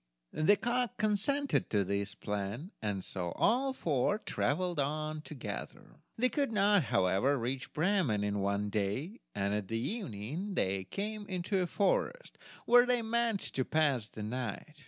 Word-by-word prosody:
The 160 +7 +5
cock 240 +1 0
consented 220 +7 +1
to 105 -2 +2
this 100 +2 -2
plan, 105 - -4
and 100 -3 -2
so 90 -3 -3
all 260 +5 +3
four 165 - +1
traveled 180 -5 -1
on 155 +2 -1
together. 150 -4 -7 0.2
They 250 +3 +3
could 280 -2 0
not, 205 -5 +4
however, 95 +9 +2
reach 130 +3 -3
Bremen 155 - +1
in 105 0 0
one 100 +1 0
day, 110 - -2 0.2
and 100 0 0
at 105 -1 -3
evening 150 - -3
they 95 0 0
came 210 - -4
into 185 +1 -1
a 180 - +1
forest, 345 - 0 0.3
where 245 +1 +7
they 245 -2 +2
meant 230 -2 +1
to 130 - -1
pass 140 -7 +1
the 110 - -7
night. 125 +6 -5
155 Hz, 150 wpm, -32 LUFS, -, 0.3 s, where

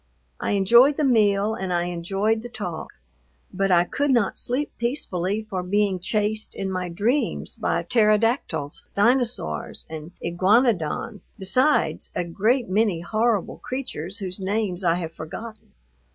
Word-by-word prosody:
I - - -1
enjoyed 235 +8 +5
the 305 - +1
meal 210 -5 +3
and 190 -4 -4
I 175 -1 +1
enjoyed 195 +6 -1
the 240 - -8
talk, 180 -9 -5 0.6
but 195 +1 0
I 175 -1 +5
could 285 +10 -1
not 235 -7 +2
sleep 265 +5 -1
peacefully 215 - -1
for 190 -4 -3
being 195 +1 +1
chased 215 +3 -1
in 195 -1 -3
my 185 -1 -3
dreams 225 +12 -1
by - - -1
pterodactyls, 215 - +1
dinosaurs, 220 - +1
and 160 +1 -7
iguanodons, 190 - +1
besides 255 +10 +1
a - - 0
great 220 +9 +1
many 195 -3 +1
horrible 215 +2 0
creatures 210 - -4
whose 190 -2 -4
names 195 -1 -1
I 170 -1 +3
have 165 -2 -4
forgotten. 220 +9 -9
205 Hz, 135 wpm, -24 LUFS, 180-230 Hz, 0.6 s, enjoyed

